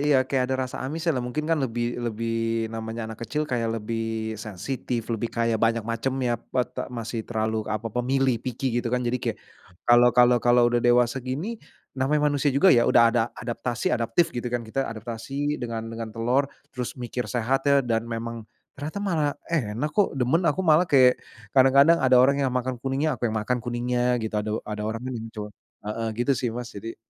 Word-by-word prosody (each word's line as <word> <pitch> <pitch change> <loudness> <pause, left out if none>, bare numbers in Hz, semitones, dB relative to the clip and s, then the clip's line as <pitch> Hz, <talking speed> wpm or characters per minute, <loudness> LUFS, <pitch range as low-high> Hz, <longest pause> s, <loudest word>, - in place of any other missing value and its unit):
iya, 140 -3 +3
kayak 130 -1 0
ada 130 - 0
rasa 130 - -7
amis 155 +5 -4
lah, 125 - -1
mungkin 125 +5 -3
kan 160 -2 +1
lebih 120 -1 -2
lebih 115 -1 -2 0.4
namanya 115 0 -5
anak 110 0 -8
kecil, 145 +7 -2
kayak 120 -5 -1
lebih 110 0 -3
sensitif, 115 +3 -4
lebih 115 +1 -2
kayak 115 -2 0
banyak 115 -1 +2
macemnya 120 0 -1
pete 125 -1 -3
masih 115 -1 -4
terlalu 110 -1 -1
apa 110 0 -3
pemilih 125 -1 +1
picky 125 -1 -2
gitu 120 - -3
kan, 125 +1 0
jadi 120 +1 -1
kayak - - -2 0.5
kalau 120 0 +6
kalau 125 0 +6
kalau 120 0 +4
udah 120 - +3
dewasa 120 +2 +3
gini, 155 - -4 0.3
namanya 145 +2 +1
manusia 145 0 +1
juga 140 +8 +5
ya, 120 -1 +4
udah 120 - +6
ada 120 - +3
adaptasi, 120 0 -2
adaptif 120 +8 +1
gitu 120 0 -3
kan, 120 -1 -2
kita 135 +5 -2
adaptasi 120 +6 -4
dengan 115 -2 -4
dengan 115 -1 -5
telur. 120 +5 0 0.2
Terus 125 +1 -5
mikir, 125 0 -4
sehat 135 +3 0
ya, 140 -2 +4
dan 115 0 -1
memang, 115 -1 -5 0.2
ternyata 150 +8 -6
malah 155 -6 +1 0.2
enak 130 0 -1
kok, 200 -8 +1
demen 130 +7 +2
aku 165 +6 +1
malah, 160 +2 +4
kayak 130 -3 +5 0.3
kadang-kadang 140 +5 +6
ada 130 -1 +5
orang 140 +3 +5
yang 135 - +2
makan 125 -1 -2
kuningnya, 135 +4 -1
aku 120 - +1
yang 110 - -3
makan 125 +4 0
kuningnya 125 0 0
gitu, 110 -1 -4
ada 105 - -4
ada 105 0 -5
orang 115 +3 -4
tuh 130 - -4
muncul. 110 -2 -6 0.4
Heeh 115 +1 -2
gitu 135 +3 +2
sih, 125 -1 -1
Mas, 120 +1 -6
jadi 115 +3 -7
120 Hz, 190 wpm, -25 LUFS, 115-135 Hz, 0.5 s, kalau